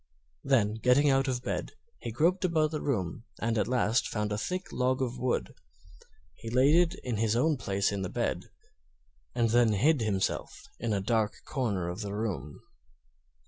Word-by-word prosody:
Then, 120 -7 +2
getting 135 +4 +4
out 135 +1 +2
of 125 -1 -2
bed, - - -3 0.3
he - - -5
groped 170 - +2
about 160 -4 +2
the 155 - -3
room 110 - -2
and 115 +1 0
at 105 - +1
last 120 -2 +1
found 105 -1 -2
a 105 - -1
thick 185 - -2
tog 130 +1 +1
of 125 -2 -2
wood. 130 - -1 0.8
He 115 - -8
laid 130 +5 +4
it 175 -1 +3
in 120 -4 -2
his 110 0 +1
own 155 +6 +3
place 100 -6 0
in 100 -1 -3
the 90 - -3
bed, - - -2 0.9
and 115 -2 +2
then 120 -2 +4
hid 140 +7 +3
himself 100 -4 -2 0.2
in 115 - -2
a 100 -2 0
dark 110 0 0
corner 105 - -1
of 90 +5 -5
the 100 -1 -4
room. 90 -10 -4
115 Hz, 180 wpm, -29 LUFS, 105-135 Hz, 0.9 s, getting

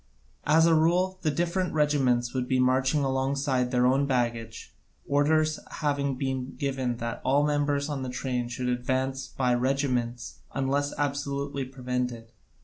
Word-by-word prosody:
As 160 +2 +5
a 165 - +5
rule, 180 +4 +2
the 160 - +1
different 175 +3 -1
regiments 130 -5 +2
would 130 -1 -1
be 130 0 +1
marching 130 +3 +2
alongside 135 -1 0
their 125 -1 +2
own 135 +2 +3
baggage, 120 -3 -2 0.3
orders 155 +2 +2
having 140 -3 -1
been 130 0 -3
given 130 -3 -2
that 115 0 -4
all 140 +2 +3
members 145 -1 +1
of 145 -3 -3
the 130 - -3
train 125 -1 -2
should 125 +1 -3
advance 130 +2 -1
by 125 -2 0
regiments 125 -2 -1
unless 140 +1 0
absolutely 140 -1 -2
prevented. 125 -3 -4
135 Hz, 140 wpm, -27 LUFS, 125-145 Hz, 0.3 s, As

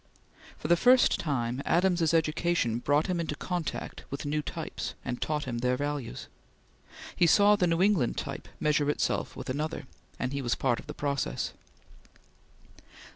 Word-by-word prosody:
For - - -5
the 175 - +6
first 250 +7 +5
time 125 -4 -1
Adams's 175 -3 +2
education 160 -6 +1
brought 145 +4 +2
him 180 -2 -1
in 165 - -2
contact 175 +2 -4
with 140 - -5
new 150 +1 0
types - - -5
and 125 - -3
taught 150 -1 -1
him 120 -3 -3
their 125 +1 +1
values. 145 -3 -4 0.9
He 175 - +4
saw 205 +4 +6
the 180 -3 +2
New 165 +2 +2
England 190 - +2
type - - -5
measure 150 -1 +2
itself 150 - -1
with - - -7
another, 150 +2 -3 0.3
and 125 +1 -2
he 140 - -2
was 120 -2 0
part 125 -3 +1
of - - -12
the 150 - -7
process. 140 - -2
150 Hz, 160 wpm, -29 LUFS, 130-170 Hz, 0.9 s, the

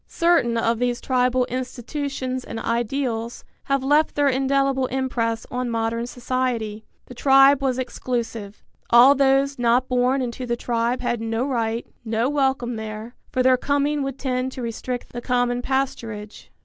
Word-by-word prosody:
Certain 335 -9 +2
of 230 0 +1
these 245 -1 0
tribal 255 -1 +1
institutions 255 +1 -4
and 225 - -6
ideals 235 0 -2 0.2
have 275 -1 0
left 295 +3 +2
their 290 -1 +3
indelible 270 0 +1
impress 245 -3 -1
on 250 0 -2
modern 230 +1 -1
society. 240 -4 -2 0.2
The - - -11
tribe 270 +2 +5
was 260 -2 0
exclusive. 235 -4 -4 0.3
All 240 +4 +8
those 275 0 +2
not 245 +2 +3
born 250 +2 +2
into 250 +1 -5
the 235 0 -1
tribe 235 +1 -1
had 240 -2 -1
no 225 +2 -1
right, 230 -4 -1 0.2
no 225 +2 0
welcome 265 -4 0
there, 220 +2 -6 0.2
for 255 - +1
their 255 0 +5
coming 285 +2 0
would 275 -1 -3
tend 255 -1 -2
to 255 - -6
restrict 240 +2 -5
the 240 - -5
common 245 0 0
pasturage. 230 -6 -3
250 Hz, 150 wpm, -23 LUFS, 235-270 Hz, 0.3 s, All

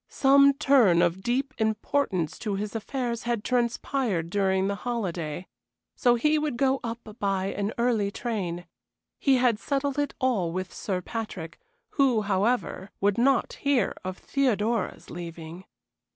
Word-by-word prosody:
Some 280 +1 +5
turn 265 - +4
of 175 +2 0
deep 260 +7 -1
importance 220 - 0
to 210 -3 -2
his 205 +1 -4
affairs 235 +1 -3
had 235 -3 -2
transpired 235 - 0
during 190 -1 +1
the 200 - 0
holiday. 180 -9 -3 0.5
So 245 -2 +4
he 300 +6 +2
would 300 -5 -2
go 270 +1 +2
up 230 -2 -6
by 195 -1 0
an 205 +1 -2
early 235 -4 +1
train. 195 -6 -3 0.5
He 275 -2 +4
had 245 -4 +2
settled 280 +1 -1
it 290 - -1
all 215 -10 +1
with 185 +1 -4
Sir 185 -3 -3
Patrick, 190 -8 -6 0.3
who, 255 -6 +2
however, 200 0 0
would 205 +2 +1
not 265 +1 +2
hear 275 -8 +2
of 185 0 -5
Theodora's 235 -6 -1
leaving. 170 0 -8
220 Hz, 140 wpm, -27 LUFS, 190-255 Hz, 0.5 s, Some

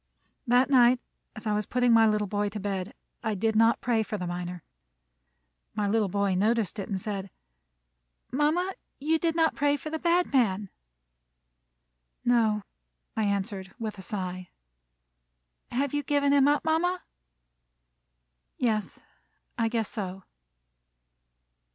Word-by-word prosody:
That 250 +3 +4
night 250 -1 +6 0.4
as 215 - -9
I 215 - +1
was 210 0 -1
putting 245 -1 +3
my 225 -1 +6
little 210 -1 +1
boy 205 +1 -1
to 210 +1 -6
bed, 195 -2 -3 0.3
I 220 -2 -1
did 220 +3 0
not 225 +1 +4
pray 230 -2 +2
for 215 0 -3
the 180 - -4
miner. 175 0 -5 1.1
My 210 -1 0
little 210 -1 +2
boy 200 0 +1
noticed 210 +1 +1
it 195 - -5
and 195 -2 -1
said: 195 -1 -4 1.0
"Mama, 315 +7 +1 0.3
you 315 +3 +1
did 330 -1 0
not 325 -1 +3
pray 290 0 +2
for 310 +3 -7
the 320 - -2
bad 345 -1 +2
man." 205 -6 +2 1.6
"No," 225 -4 +3 0.5
I 220 - +1
answered, 195 -1 -2
with 215 -4 -5
a - - -6
sigh. 185 -2 -5 1.2
"Have 275 +3 -1
you 290 - +1
given 285 -1 +2
him 280 -1 +5
up, 290 +1 +2
mama?" 355 +3 +1 1.5
"Yes, 220 -4 0 0.6
I 230 -1 +1
guess 225 -2 -1
so." 195 -3 -5
220 Hz, 140 wpm, -28 LUFS, 200-275 Hz, 1.6 s, night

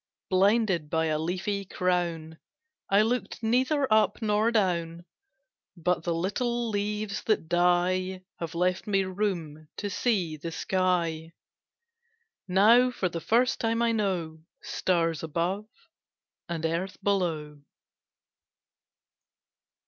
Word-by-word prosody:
Blinded 190 -4 +2
by 160 0 +1
a 155 -1 0
leafy 190 +5 -2
crown 170 -4 -2 0.5
I 200 +2 +5
looked 240 +1 -2
neither 260 +5 +2
up 215 -2 +3
nor 215 0 +2
down 170 -6 0 0.7
But 175 +1 0
the 170 0 -1
little 235 +7 -1
leaves 210 0 -2
that 215 -7 +1
die 180 +2 +1 0.2
Have 170 0 -5
left 180 +3 0
me 195 -2 +2
room 180 -6 -3
to 205 -1 -3
see 185 -6 0
the 165 +3 -6
sky; 170 -3 -1 1.1
Now 220 +7 +5
for 195 -7 -2
the 165 -1 -5
first 245 +6 +2
time 230 +1 0
I 235 - +3
know 185 -7 -1 0.2
Stars 165 -4 0
above 175 +6 -2 0.8
and 165 -1 -3
earth 170 +4 -2
below. 160 -7 -1
185 Hz, 110 wpm, -27 LUFS, 165-210 Hz, 1.1 s, I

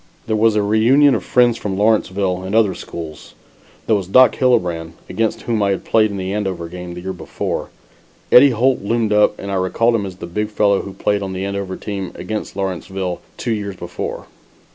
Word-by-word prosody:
There 110 - 0
was 110 0 +3
a 105 - +2
reunion 120 +7 +4
of - - -1
friends 120 -2 +3
from 95 -2 -3
Lawrenceville 100 -3 +1
and 95 +3 -4
other 110 -4 +4
schools. 80 -3 -9 0.5
There 110 - +3
was 95 -3 -2
Doc 130 +5 +6
Hillebrand, 90 -11 +1
against 110 -1 -1
whom 115 -3 -1
I 100 - +2
had 95 - -2
played 110 -1 +3
in 100 - -5
the 95 0 -3
Andover 95 -5 -3
game 90 0 -8
the 90 - -7
year 95 +1 -4
before. 90 - -4 0.6
Eddie 140 +3 +8
Holt 125 +2 +1
loomed 110 +1 0
up 105 0 +3
and 100 - -6
I 95 -1 0
recalled 115 +6 +1
him 105 -4 0
as 95 - -8
the 90 - -8
big 105 +5 -3
fellow 105 -2 +2
who 100 - -8
played 105 +1 0
on 95 -1 -4
the 95 +1 -3
Andover 100 -1 -3
team 100 -3 -5
against 105 +4 -5
Lawrenceville 95 -1 -3 0.2
two 120 - -3
years 100 -2 -4
before. - - -6
100 Hz, 205 wpm, -19 LUFS, 95-110 Hz, 0.6 s, Eddie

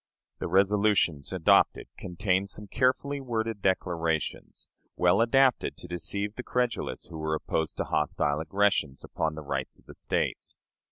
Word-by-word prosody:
The - - -3
resolutions 100 -5 +2
adopted 90 -4 +3
contained 95 +1 -1
some 105 - -3
carefully 135 +5 0
worded 115 -4 -2
declarations, 85 -4 -1 0.3
well 90 +4 +3
adapted 130 +2 +3
to - - -10
deceive 100 +4 -3
the 125 - -6
credulous 125 -1 -2
who 80 - -7
were 80 0 -1
opposed 80 0 -2
to - - 0
hostile 75 -1 0
aggressions 80 -4 0
upon 80 -1 -2
the 80 - -7
rights 70 -2 -4
of - - -26
the - - -12
States. - - -2
95 Hz, 145 wpm, -28 LUFS, 80-110 Hz, 0.3 s, adopted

